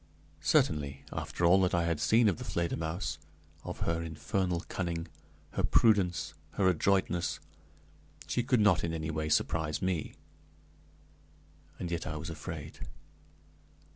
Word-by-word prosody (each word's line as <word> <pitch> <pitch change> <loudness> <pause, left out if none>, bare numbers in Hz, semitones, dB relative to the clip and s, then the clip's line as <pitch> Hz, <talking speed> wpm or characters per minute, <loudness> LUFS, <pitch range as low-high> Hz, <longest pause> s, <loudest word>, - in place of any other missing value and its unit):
Certainly, 70 -2 +1
after 85 - -2
all 95 +3 +6
that 90 -1 +2
I 85 - +2
had 85 -2 0
seen 115 +5 +4
of 95 -6 +2
the - - -5
Fledermausse, 85 0 -2 0.4
of - - -6
her 85 0 0
infernal 85 +2 -1
cunning, 85 -3 -3 0.4
her - - -1
prudence, 90 -8 +3 0.2
her 95 - +2
adroitness, 90 0 +1 0.9
she 120 - 0
could 125 -1 +2
not 100 -5 +4
in 85 -1 -1
any 80 -1 -3
way 75 0 -2
surprise 75 -1 +1
me; 90 -4 -2 1.6
and 85 -2 -4
yet 85 +1 -2
I 80 - -3
was 75 - -5
afraid. - - -7
85 Hz, 135 wpm, -31 LUFS, 80-95 Hz, 1.6 s, all